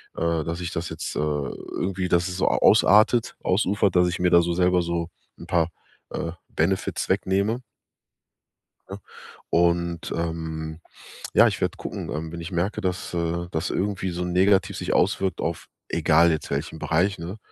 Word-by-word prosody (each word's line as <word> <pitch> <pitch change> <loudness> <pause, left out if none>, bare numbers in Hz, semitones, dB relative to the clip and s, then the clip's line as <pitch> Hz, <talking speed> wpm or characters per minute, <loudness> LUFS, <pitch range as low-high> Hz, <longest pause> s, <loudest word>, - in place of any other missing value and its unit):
äh 85 -1 0
dass 85 +2 -4
ich 85 - -3
das 85 0 -3
jetzt, 80 - -5
äh, - - -1
irgendwie 75 +5 -2
dass 85 +1 +2
es 90 0 -5
so 95 - +1
a - - +1
ausartet, 110 +4 +5
ausufert, 100 0 +1
dass 90 0 +5
ich 90 0 -2
mir 90 - +3
da 85 -1 +6
so 85 - -1
selber 90 0 +3
so 85 0 -2 0.3
'n - - -10
paar, 85 -1 +2 0.4
äh, 85 - -3 0.2
Benefits 95 +4 -1
wegnehme. 100 +6 +1 1.3
Ne? 100 +1 -7 0.5
Und, 85 0 +1
ähm, 80 -1 -4 0.5
ja, - - +7
ich - - -2
werde - - -1
gucken, - - -6
ähm, 80 +1 -4
wenn 85 - -6
ich 85 +3 -7
merke, 90 +4 -1
dass, 90 -1 -3
äh, 85 0 -1
dass 80 -1 -2
irgendwie 95 -1 -1
so 90 +1 -3
negativ 95 +2 +2
sich 90 - -2
auswirkt 95 -2 +1
auf, 85 0 -3 0.2
egal 85 +1 +4
jetzt 80 -2 -3
welchen 80 - -3
Bereich, 90 +6 +1
ne? 85 +6 -6
85 Hz, 170 wpm, -24 LUFS, 85-95 Hz, 1.3 s, ja